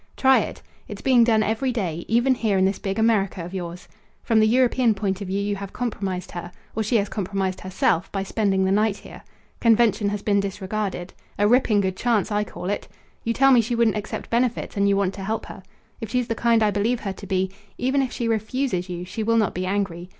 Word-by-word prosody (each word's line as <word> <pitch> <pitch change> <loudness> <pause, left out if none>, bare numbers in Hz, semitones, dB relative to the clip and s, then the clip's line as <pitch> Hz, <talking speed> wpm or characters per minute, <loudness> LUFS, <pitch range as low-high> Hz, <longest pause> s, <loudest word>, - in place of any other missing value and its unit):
"Try 265 0 +5
it. - - -5 0.2
It's - - -8
being 255 -3 +5
done 220 -2 +3
every 225 +5 0
day; 175 -8 -3
even 240 +4 +3
here 220 -5 0
in 190 - +3
this 195 0 0
big 195 -1 -3
America 205 -6 +1
of 180 - -9
yours. 180 -1 -6 0.4
From 225 -2 +3
the 215 - +5
European 245 -1 +3
point 195 -1 -2
of 200 - -4
view 195 +2 -1
you 205 0 -1
have 200 0 -7
compromised 195 -7 -3
her 175 0 -7 0.2
or 220 - 0
she 220 +2 0
has 205 -2 +2
compromised 195 -2 -2
herself, 185 -1 0
by 195 -1 -2
spending 195 -2 +1
the 190 - +1
night 210 0 +2
here. - - -12 0.4
Convention 225 -2 +3
has 205 0 -4
been 200 -1 +2
disregarded. 195 -1 -3 0.2
A 205 - +3
ripping 225 -3 +4
good 190 -1 -1
chance, 230 -4 +1
I 210 0 +1
call 195 -1 -5
it. 205 - -3 0.4
You 230 - 0
tell 270 0 +5
me 245 -3 +6
she 235 +2 -2
wouldn't 230 -2 +2
accept 210 0 -5
benefits, 240 0 0
and 200 0 +2
you 200 - +3
want 195 -1 +1
to 195 - -7
help 220 +3 -2
her. - - -10 0.4
If 225 - -5
she's 250 +1 0
the - - +1
kind 230 0 +2
I 210 - +3
believe 225 +4 0
her 195 -2 -3
to 200 +1 -11
be, 190 -1 0 0.3
even 265 +2 +1
if 260 - -2
she 235 - -2
refuses 220 -3 -1
you 175 0 -5
she 220 - -5
will 230 +1 +2
not 215 -3 +2
be 185 +1 -3
angry. 185 -3 -2
205 Hz, 230 wpm, -23 LUFS, 195-230 Hz, 0.4 s, me